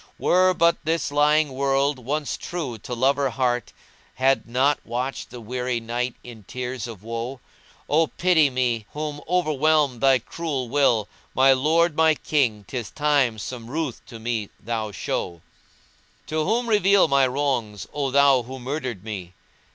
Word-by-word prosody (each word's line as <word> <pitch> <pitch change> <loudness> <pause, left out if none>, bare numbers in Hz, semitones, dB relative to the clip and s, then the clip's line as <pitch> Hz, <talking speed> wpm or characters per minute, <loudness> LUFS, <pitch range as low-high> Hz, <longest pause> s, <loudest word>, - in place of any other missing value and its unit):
Were 185 +1 +3
but 170 0 +3
this 160 -2 -1
lying 150 +1 +3
world 135 +1 +1
once 145 +4 -2
true 140 -10 -5
to 125 - -6
lover 135 +3 +2
heart 125 0 -1 0.2
* - - -32
He 130 - -8
had 135 -2 +3
not 135 +4 +2
watched 125 +3 -4
the 125 - -9
weary 125 +1 -2
night 120 +2 -3
in 115 -3 -11
tears 125 +1 -5
of 110 -4 -10
woe: 115 +3 -5 0.5
Oh 160 +2 +3
pity 170 -5 +3
me 120 -4 -1
whom 150 -1 -4
overwhelmed 155 -6 +2
thy 135 -1 +5
cruel 135 -1 -4
will 120 -6 +2
* - - -34
My 135 +1 +6
lord, 155 +5 +2
my 160 0 +4
king, 120 -10 0
'tis 120 -5 -5
time 145 -6 +1
some 115 +1 -7
ruth 150 -3 -3
to 115 - -9
me 110 -2 -3
thou 110 -1 -3
show: 85 -3 -4 0.8
To 155 0 -1
whom 235 +5 0
reveal 200 -3 +4
my 135 -1 +4
wrongs, 125 -7 -2
O 140 -2 -1
thou 140 -1 +5
who 130 +3 -8
murdered 130 -6 -4
me? 95 -5 -6
135 Hz, 160 wpm, -24 LUFS, 120-150 Hz, 0.8 s, My